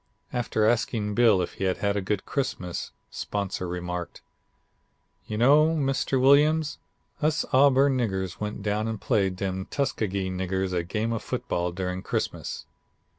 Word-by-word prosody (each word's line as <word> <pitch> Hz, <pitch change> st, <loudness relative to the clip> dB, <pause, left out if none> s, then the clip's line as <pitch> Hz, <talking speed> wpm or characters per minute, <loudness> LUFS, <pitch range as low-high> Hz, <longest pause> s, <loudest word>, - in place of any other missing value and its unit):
"After 115 Hz, -3 st, 0 dB
asking 110 Hz, -2 st, +1 dB
Bill 105 Hz, -5 st, +4 dB
if -, -, -6 dB
he -, -, +2 dB
had 95 Hz, -1 st, +1 dB
had 100 Hz, 0 st, 0 dB
a 100 Hz, -, 0 dB
good 95 Hz, +1 st, -2 dB
Christmas, 95 Hz, -11 st, -3 dB, 0.2 s
'Sponsor' 100 Hz, -2 st, -3 dB
remarked: 90 Hz, 0 st, -5 dB, 1.0 s
'You 105 Hz, -, -3 dB
know, 150 Hz, +7 st, +5 dB
Mr. 135 Hz, -2 st, 0 dB
Williams, 150 Hz, +4 st, +4 dB, 0.4 s
us 155 Hz, +1 st, +1 dB
Auburn 135 Hz, 0 st, +5 dB
niggers 95 Hz, -6 st, -2 dB
went 105 Hz, -1 st, -4 dB
down 105 Hz, +1 st, 0 dB
and 110 Hz, -2 st, -3 dB
played 100 Hz, -6 st, +1 dB
dem 95 Hz, 0 st, -3 dB
Tuskegee 100 Hz, -8 st, -1 dB
niggers 95 Hz, 0 st, -2 dB
a 90 Hz, -, +1 dB
game 110 Hz, +6 st, -2 dB
of 115 Hz, -, -2 dB
football 90 Hz, 0 st, -2 dB
during 90 Hz, +1 st, -3 dB
Christmas.' -, -, -3 dB
105 Hz, 145 wpm, -26 LUFS, 95-130 Hz, 1.0 s, know